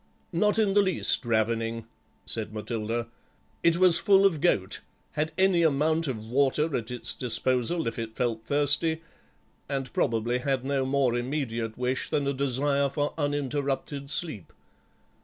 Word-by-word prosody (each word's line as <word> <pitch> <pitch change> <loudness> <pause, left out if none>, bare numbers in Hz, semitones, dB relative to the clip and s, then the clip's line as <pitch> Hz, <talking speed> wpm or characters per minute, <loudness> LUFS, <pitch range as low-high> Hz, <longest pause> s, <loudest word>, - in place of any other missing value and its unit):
"Not 210 +5 +2
in 210 -3 +2
the 205 - +5
least 190 -6 0
ravening," 115 0 0 0.4
said 110 -2 -2
Matilda; 110 +2 -3 0.5
"it 170 0 +3
was 180 -2 +5
full 195 0 +5
of 165 -7 +2
goat, 95 - +1 0.3
had 155 +1 -1
any 190 -2 +4
amount 160 +1 +2
of 110 -5 -4
water 140 +5 +1
at 110 -2 -3
its 125 -1 -3
disposal 125 +5 0
if 115 - -3
it 110 -1 -5
felt 115 -3 -1
thirsty, 145 +5 +2 0.7
and 135 -2 -3
probably 120 +2 0
had 130 0 -1
no 135 -1 0
more 135 -3 +2
immediate 120 -3 -3
wish 125 +1 -1
than 145 - 0
a 140 - 0
desire 140 +1 +1
for 145 +1 -2
uninterrupted 145 -1 -2
sleep. 150 - -2
135 Hz, 145 wpm, -27 LUFS, 115-155 Hz, 0.7 s, the